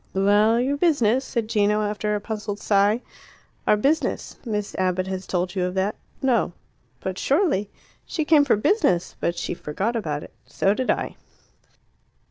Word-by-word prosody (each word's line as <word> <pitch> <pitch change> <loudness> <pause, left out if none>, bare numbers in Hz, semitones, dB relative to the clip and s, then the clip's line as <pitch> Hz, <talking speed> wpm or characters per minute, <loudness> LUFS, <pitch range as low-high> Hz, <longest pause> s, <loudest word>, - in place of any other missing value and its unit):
"Well, 205 +4 +4
your 270 +3 0
business," 265 -7 +3
said 235 -4 -2
Gino, 210 -1 +2
after 210 0 -1
a - - -1
puzzled 210 -1 -4
sigh. 205 +3 +2 0.6
"Our 210 - +5
business 290 +9 0
Miss 210 -4 -3
Abbott 185 0 +1
has 190 0 -5
told 180 0 -1
you 185 -3 -1
of 180 +1 -3
that." 190 +2 0 0.3
"No." 235 -9 +2 0.5
"But 190 -1 -4
surely 275 - +1 0.2
" - - -31
"She 315 -3 -2
came 300 -2 +6
for 280 - +3
business. 210 - +1
But 170 - 0
she - - -2
forgot 190 +8 -3
about 150 -9 -2
it; - - -13
so 195 - +1
did 255 +3 -2
I." - - -1
210 Hz, 165 wpm, -24 LUFS, 190-245 Hz, 0.6 s, came